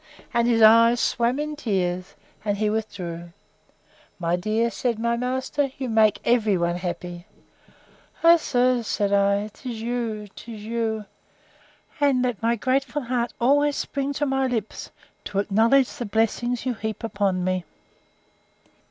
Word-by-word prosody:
—And 235 0 +2
his 230 -2 +3
eyes 230 +2 +7
swam 240 +3 +1
in 300 +1 -3
tears, 185 -8 -2 0.3
and 205 -1 -1
he 210 0 +1
withdrew.—My 175 -3 -6
dear, 215 +5 0
said 240 -2 -1
my 235 +1 0
master, 260 +3 -1
you 260 -2 -3
make 220 -2 +3
every 220 -5 +3
one 170 0 0
happy!—O, 180 - -2
sir, 250 -5 +1
said 205 -2 -1
I, 200 +1 +2
'tis 245 -4 -7
you, 230 -3 -3
'tis 220 -3 -9
you! 220 -1 -2 0.9
And 275 -3 +3
let 245 -5 -2
my 230 +1 +2
grateful 265 +4 -1
heart 240 -1 -1
always 285 +4 +3
spring 275 0 -2
to 295 - -1
my 270 -1 +1
lips, 225 -4 -4 0.4
to 205 - -5
acknowledge 225 +7 +3
the 250 -5 -5
blessings 225 +3 0
you 255 - 0
heap 220 -1 -5
upon 200 -5 0
me. 185 0 -1
230 Hz, 135 wpm, -24 LUFS, 205-250 Hz, 0.9 s, eyes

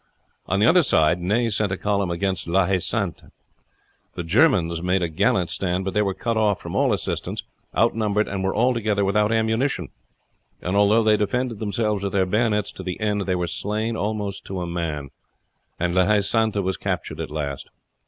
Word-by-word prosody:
On 95 - +1
the 105 - +4
other 180 +9 +6
side 80 - +3
Ney 110 +7 +1
sent 105 -1 0
a 95 - -1
column 100 -2 0
against 90 0 -2
La 95 +2 +3
Haye 95 0 +1
Sainte. 100 0 -2 0.9
The 90 - -3
Germans 85 - +3
made 90 +1 +1
a - - +1
gallant 85 +1 +1
stand; 95 0 -1
but 95 - -2
they 105 - +2
were 100 -2 -1
cut 115 -2 -2
off 105 -3 +2
from - - -7
all - - +3
assistance, - - -2 0.3
outnumbered, 110 -2 +2
and 95 -1 -3
were 95 - 0
altogether 110 -4 +1
without 105 +2 +2
ammunition; 110 - 0 0.7
and 90 +2 -2
although 105 +3 +4
they 110 -1 +4
defended 120 +1 -1
themselves 105 -1 -1
with 100 - -2
their 95 -2 +3
bayonets 105 +1 +1
to - - -9
the 90 -1 -5
end, 105 -2 -1
they 95 - +1
were 90 -1 -1
slain 110 +5 -2
almost 105 -2 -3
to 95 -1 -5
a - - -2
man, 80 -5 -4 0.7
and 85 0 0
La 95 +1 +3
Haye 105 -1 +4
Sainte 110 0 +1
was 95 0 -1
captured - - -3
at - - -4
last. 70 -3 -4
100 Hz, 195 wpm, -23 LUFS, 90-110 Hz, 0.9 s, other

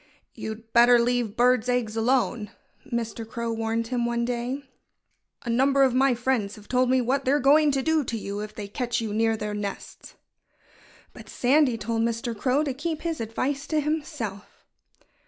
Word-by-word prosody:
"You'd 220 0 -8
better 240 +1 +7
leave 235 -2 0
birds' 250 0 +3
eggs 240 -3 0
alone!" 235 -2 +1 0.4
Mr. 230 -1 -3
Crow 230 +1 -4
warned 225 0 -2
him 245 -2 -1
one 235 0 0
day. 245 +3 -3 0.8
"A 240 - -5
number 270 +3 +3
of 260 -2 +3
my 260 0 +3
friends 235 -4 -1
have 210 -2 -15
told 255 0 +2
me 260 0 +3
what 265 +3 0
they're 275 +3 +2
going 295 +3 +5
to 270 -1 0
do 320 0 +2
to 235 - -3
you, 200 -1 -5
if 210 0 -7
they 205 - -6
catch 235 +3 -2
you 220 -3 -3
near 225 +1 +1
their 210 -1 -4
nests." 205 -1 -7 1.0
But - - -13
Sandy 260 -1 +2
told 225 +1 -2
Mr. 230 0 -1
Crow 260 +7 +1
to 280 -3 -2
keep 310 +3 -4
his 330 -6 -2
advice 270 +6 -2
to 310 - +1
himself. 295 - -4
240 Hz, 175 wpm, -25 LUFS, 225-265 Hz, 1.0 s, better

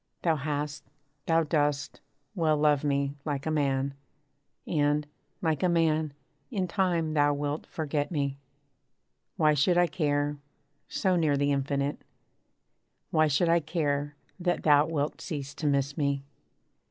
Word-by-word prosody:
Thou 165 -2 +3
hast, 145 0 -3 0.4
thou 165 0 +4
dost, 145 -2 0 0.3
well 160 -5 +2
love 150 -1 +3
me, 140 -1 0
like 140 -3 -3
a 155 - 0
man: 140 -2 0 0.7
And, 150 -1 +1 0.4
like 160 -3 +1
a 180 - +3
man, 160 -3 +2 0.4
in 185 -2 -1
time 170 -4 0
thou 145 -1 +3
wilt 145 +1 -3
forget 150 -2 -2
me. 140 -4 -2 1.0
Why 155 -1 +4
should 150 +5 +3
I 175 - +6
care, 145 -4 -1 0.5
so 190 -2 +1
near 155 -4 +2
the 145 +1 +2
Infinite 140 +1 -1 1.1
Why 155 -1 +4
should 150 +4 +2
I 170 +1 +5
care, 145 -3 -1 0.2
that 175 0 0
thou 150 0 +5
wilt 150 -2 -2
cease 145 -3 -5
to 155 - -3
miss 140 0 +1
me? 140 -3 0
150 Hz, 140 wpm, -28 LUFS, 145-160 Hz, 1.1 s, I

